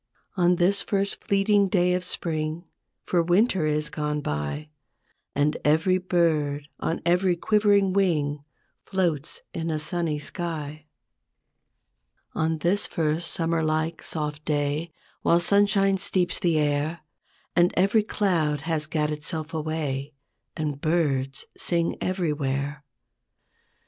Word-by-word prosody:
On 180 -1 +4
this 190 +3 +3
first 200 0 -2
fleeting 200 0 +3
day 180 -1 +3
of 180 0 -1
Spring, 160 -1 -2 0.4
For 175 - +2
Winter 175 0 +2
is 150 0 -1
gone 150 -1 -2
by, 75 - -3 0.6
And 145 +2 +2
every 160 +5 +3
bird 155 -5 +1
on 165 - -2
every 180 +1 +3
quivering 200 0 +3
wing 150 -7 +1 0.4
Floats 170 -6 -1
in 165 0 -3
a 155 - 0
sunny 160 0 -1
sky; 155 -1 -5 1.5
On 160 0 0
this 180 +6 +1
first 160 0 -1
Summer 165 -1 0
like 155 +1 -1
soft 150 -1 -3
day, 150 +2 -1 0.3
While 170 - +4
sunshine 195 +1 +3
steeps 185 -2 +1
the 170 -3 +2
air 150 +2 0 0.5
And 175 0 +4
every 200 +4 +4
cloud 170 -9 0
has 155 -1 -2
gat 150 -1 0
itself 155 +1 -4
away, 150 -3 -3 0.4
And 150 -3 -3
birds 140 -5 0
sing 170 -1 0
everywhere. 150 -5 -1
160 Hz, 120 wpm, -25 LUFS, 150-180 Hz, 1.5 s, On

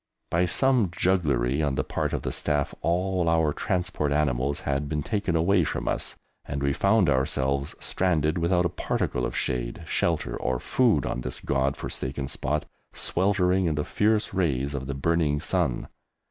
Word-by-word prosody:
By 90 +2 +2
some 125 +1 +3
jugglery 75 -8 +1
on 70 -3 0
the - - 0
part - - -2
of - - -3
the - - -2
Staff, 75 -2 -1
all 90 +1 +1
our 80 -2 +2
transport 90 -5 -1
animals 70 -1 0
had 70 +1 -1
been 75 -2 -1
taken 100 -2 -1
away 90 +3 +3
from - - -3
us, - - -2 0.3
and 70 0 -4
we 70 0 +2
found 100 +1 +3
ourselves 70 0 +1
stranded 85 -3 0
without 90 +1 +2
a - - +2
particle 60 - -1
of - - -5
shade, - - -2
shelter, - - 0
or 65 0 -1
food 110 - +2
on 65 - -2
this 65 0 -4
God 70 0 0
forsaken 65 +1 -4
spot, 75 +4 -2 0.3
sweltering 95 0 +1
in 80 - 0
the 75 - -1
fierce 105 0 +1
rays 70 -6 0
of 65 -2 -4
the 70 - -3
burning 75 0 +1
sun. 80 -5 0
75 Hz, 170 wpm, -26 LUFS, 70-90 Hz, 0.3 s, some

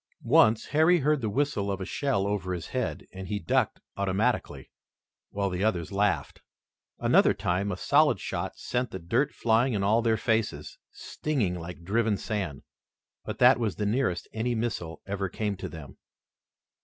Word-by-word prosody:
Once 110 0 +4
Harry 160 +3 +4
heard 150 0 +2
the 110 - -1
whistle 105 -4 0
of 100 - -3
a 95 - -4
shell 125 -2 0
over 100 -3 -2
his 85 - -7
head, - - -3
and 95 0 -7
he 105 - -2
ducked 80 -6 0 0.2
automatically, 100 +2 -1 0.6
while 100 -1 -2
the 90 +2 -2
others 95 -6 0
laughed. 100 -8 0 0.6
Another - - +4
time, 95 +3 -1
a 90 - -3
solid 145 -1 +3
shot - - -4
sent 125 0 -2
the 95 - -6
dirt 115 - 0
flying 115 +2 +2
in 100 -2 0
all 110 +4 +3
their 115 -1 +2
faces, 110 -1 -1
stinging 130 -12 -2
like 85 0 -7
driven 110 +2 +1
sand, 95 -12 -4 0.6
but - - -5
that 125 +1 +6
was 110 -4 -1
the 105 - -2
nearest 105 -5 0
any 120 +2 -1
missile 100 -8 -3
ever 100 -1 -3
came 105 +2 -2
to - - -6
them. 80 -5 -10
105 Hz, 165 wpm, -28 LUFS, 95-120 Hz, 0.6 s, that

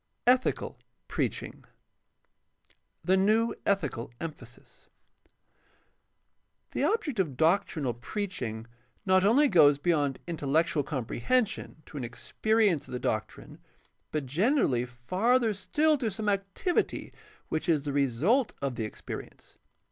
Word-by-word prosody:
5. 250 +1 +6
ETmCAL - - -3 0.3
PREACHING - - -3 1.4
The 185 - +3
new 215 +4 +3
ethical 150 -12 0
emphasis. 130 -7 -10 1.0
— - - -47
The - - -1
object 345 - 0
of' 150 -9 0
doctrinal 160 -5 +2
preach 185 - -4
ing 110 -2 -4 0.4
not 185 -1 +4
only 255 +9 +5
goes 150 - +6
beyond 145 -3 +1
intellectual 160 -1 +1
comprehension 155 - -1
to 150 - -10
an 135 - -3
experience 200 - 0
of - - -9
the 125 - -2
doctrine 110 -2 -4 0.5
but 150 -3 -2
generally 150 - +2
farther 210 - +1
still 300 +9 +2
to 230 - 0
some 210 +1 -2
activity 200 - -1 0.4
which 160 +2 -2
is 155 -4 +3
the 145 -2 -3
result 145 - +2
of 135 -4 -3
the 110 - -1
experience. 110 - -9
170 Hz, 120 wpm, -29 LUFS, 135-215 Hz, 1.4 s, 5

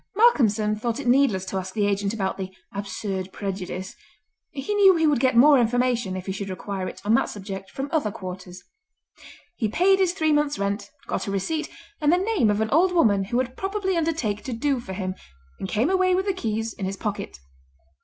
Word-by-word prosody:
Malcolmson 220 - +4
thought 230 +3 -2
it 285 - -5
needless 245 -7 +3
to 190 - -3
ask 185 +1 -5
the 210 -2 +2
agent 200 0 0
about 195 -4 -2
the 190 -1 -5 0.2
"absurd 195 -1 -4
prejudice"; 190 0 -5 0.6
he 275 +9 -4
knew 390 -2 +6
he 325 -1 +2
would 295 -4 +3
get 255 -1 +2
more 280 +2 +7
information, 240 -4 +1
if 185 - -7
he 190 - -3
should 200 +1 -5
require 190 0 -4
it, - - -8
on 215 - +3
that - - +3
subject 195 -1 -7
from 270 +1 -4
other 310 -10 +1
quarters. 185 -1 -8 0.9
He 225 - 0
paid 380 - +3
his 370 -2 +2
three 315 -4 +1
months' 295 -1 +1
rent, 200 +2 -2 0.2
got - - -3
a - - -2
receipt, 305 - -2 0.3
and 300 0 +4
the 350 - +4
name 380 - +2
of 210 +1 +1
an 220 - -1
old 360 +5 +4
woman 205 - +3
who 235 +5 -2
would 255 0 -1
probably 385 -1 -1
undertake 310 -11 -1
to 255 - -3
"do" 270 +3 0
for 190 -5 -7
him, 185 -1 -3 0.5
and 190 - -4
came 230 - +1
away 370 -1 +3
with 380 +1 0
the 395 - +1
keys 225 - -2
in 195 - -5
his 195 +1 -3
pocket. 205 - -4
225 Hz, 210 wpm, -24 LUFS, 195-305 Hz, 0.9 s, more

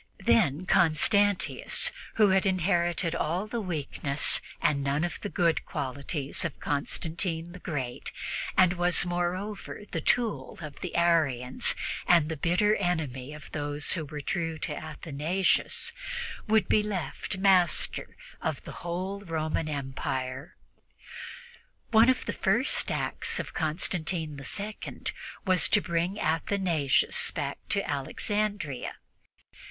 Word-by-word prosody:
Then 140 +8 +3
Constantius, 200 - +3 0.2
who 210 -2 +5
had 190 +1 +3
inherited 175 -2 +1
all 170 +6 -1
the 230 +2 -3
weakness 150 -5 +1 0.2
and 140 -2 +1
none 140 +3 +1
of 175 - -3
the 205 - -3
good 170 -4 +2
qualities 140 +2 -2
of - - -4
Constantine 165 +3 -2
the 180 - -10
Great, 130 -8 -4 0.5
and 180 -1 +6
was, 175 -1 +3
moreover, 180 +5 -3
the 165 - -2
tool 235 +5 0
of 150 -3 -8
the 180 - -5
Arians 155 -8 +2 0.3
and 170 -3 +5
the 160 - -2
bitter 180 +7 +2
enemy 150 -8 -2
of 150 0 -11
those 145 -1 -1
who 165 - -1
were 150 0 -6
true 165 +2 -2
to 150 -1 -3
Athanasius, 155 +4 0 0.5
would 220 0 +3
be 215 - +4
left 195 -2 -3
master 185 -3 +3 0.2
of - - -2
the - - -8
whole 185 +3 -3
Roman 160 -4 -2
Empire. 130 -1 -4 1.4
One 225 +2 +7
of 260 - +1
the - - -2
first - - +1
acts - - -1
of - - -5
Constantine 155 -1 -1 0.2
II 210 +2 -6 0.4
was 185 -2 +4
to - - +5
bring 175 +2 -1
Athanasius 165 -3 +2
back 140 -2 -3
to 200 -1 0
Alexandria. 170 - -2
170 Hz, 125 wpm, -28 LUFS, 150-190 Hz, 1.4 s, One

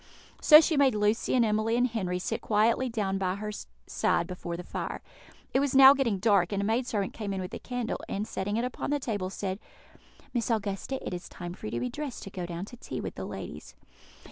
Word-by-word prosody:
So 305 0 +10
she 320 -2 +1
made 275 -4 +4
Lucy 210 +4 +1
and 240 -2 +4
Emily 215 +1 +1
and 245 - +4
Henry 200 -7 -1
sit 180 - -3
quietly 225 +4 +2
down 200 -4 -1
by 185 -1 0
her 210 +1 -4 0.3
side 170 - +1
before 175 -1 -5
the 180 - -6
fire. - - -5 0.5
It 265 - +4
was 275 -1 0
now 270 0 +10
getting 255 -8 +1
dark, 195 -3 +3
and 200 - -1
a 200 - 0
maid 235 +4 +1
servant 205 -5 -1
came 205 -3 -4
in - - -3
with 185 -1 -5
a - - -5
candle, 245 -2 -3
and, 205 +2 -2
setting 205 0 -2
it 235 - 0
upon 250 - -4
the 290 0 +1
table, 205 -8 -2
said, 190 0 -4 0.7
"Miss 240 -2 -1
Augusta, 215 +3 -1
it - - -3
is 175 0 -6
time 175 -1 -7
for 180 - -8
you - - -5
to 120 - -1
be 125 +1 -2
dressed 290 -5 -5
to 195 - -8
go 180 -2 -5
down 175 +2 -5
to 245 - -12
tea - - -6
with - - -4
the - - -6
ladies." - - -8
210 Hz, 235 wpm, -29 LUFS, 190-245 Hz, 0.7 s, So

